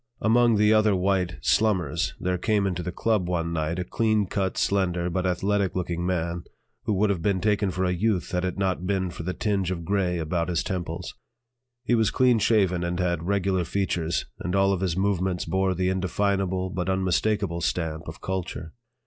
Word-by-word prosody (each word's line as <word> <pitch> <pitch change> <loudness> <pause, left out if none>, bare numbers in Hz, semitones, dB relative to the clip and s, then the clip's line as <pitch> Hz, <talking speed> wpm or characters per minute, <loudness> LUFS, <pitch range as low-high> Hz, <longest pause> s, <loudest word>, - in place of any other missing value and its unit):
Among 115 +1 +4
the 105 +1 +4
other 110 -2 +4
white 90 -2 0
"slummers" 90 -1 +1
there 90 0 -1
came 105 0 +1
into 90 -2 -1
the 90 - -4
"Club" 105 -1 0
one 85 -1 -1
night 80 +1 -1
a 90 - -1
clean 110 +2 +1
cut, 95 0 -2
slender, 90 -3 0
but 95 +2 0
athletic 100 +1 0
looking 85 -1 -2
man, 85 -1 -2 0.4
who 110 - +1
would 100 +1 +2
have 90 -4 -2
been 100 +1 +1
taken 105 0 +1
for 95 0 -1
a 90 - +1
youth 100 +1 0
had 90 0 -1
it 90 +1 -2
not 95 -2 -1
been 95 -2 0
for - - -7
the 90 +2 -3
tinge 100 -4 0
of 85 -3 -4
gray 95 -2 0
about 85 +1 -1
his 85 -1 0
temples. 85 -1 -4 0.7
He 120 - 0
was 110 -3 +3
clean 125 -3 +3
shaven 95 -6 +2
and 85 +1 -2
had 85 -2 -1
regular 95 -2 +1
features, 85 -3 -1
and 90 - -2
all 95 0 +3
of 95 - -2
his 90 -3 -1
movements 95 -2 0
bore 95 -1 0
the 90 +1 0
indefinable 95 0 0
but 90 0 -2
unmistakable 95 -1 0
stamp 80 -1 -2
of 80 - -8
culture. 90 -3 -4
95 Hz, 190 wpm, -25 LUFS, 90-100 Hz, 0.7 s, Among